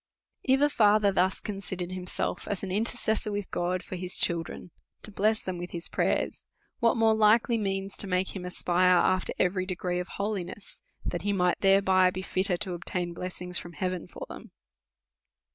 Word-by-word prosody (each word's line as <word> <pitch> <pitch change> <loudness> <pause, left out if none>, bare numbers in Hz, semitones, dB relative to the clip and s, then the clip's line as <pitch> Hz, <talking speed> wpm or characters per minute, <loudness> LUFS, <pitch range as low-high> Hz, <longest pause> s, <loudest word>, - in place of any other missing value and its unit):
If 265 +1 +3
a 290 - +5
father 210 -3 +4
thus 185 0 +2
considered 190 -3 -5
himself 180 - -3
as 200 -1 -2
an 190 - -3
intercessor 220 +1 0
with 205 -1 -4
God 180 +1 -1
for - - -6
his 180 0 -4
children, 170 0 -2 0.3
to 210 - -4
bless 215 +2 +1
them 185 -2 -4
with 175 +1 -5
his 170 0 -3
pray - - +2
ers, - - -12 0.4
Avhat 230 -1 +4
more 225 -1 +5
likely 220 +2 +4
means 195 -1 -2
to 200 - -3
make 185 +1 0
him 185 - -5
aspire 180 0 +3
after 185 +1 +2
eveiy 185 0 +1
degree 180 -1 -2
of 180 - -4
holiness, 200 -1 -3 0.2
that 175 - -2
he 205 +1 0
might 180 -2 +2
thereby 190 -1 +5
be 185 +1 -5
fit 190 +1 0
ter 180 -4 +1
to 190 -1 -3
obtain 175 0 -3
blessings 180 0 -4
from 175 - -10
heaven 180 +2 -3
for - - -8
them? - - -10
185 Hz, 185 wpm, -28 LUFS, 180-205 Hz, 0.4 s, a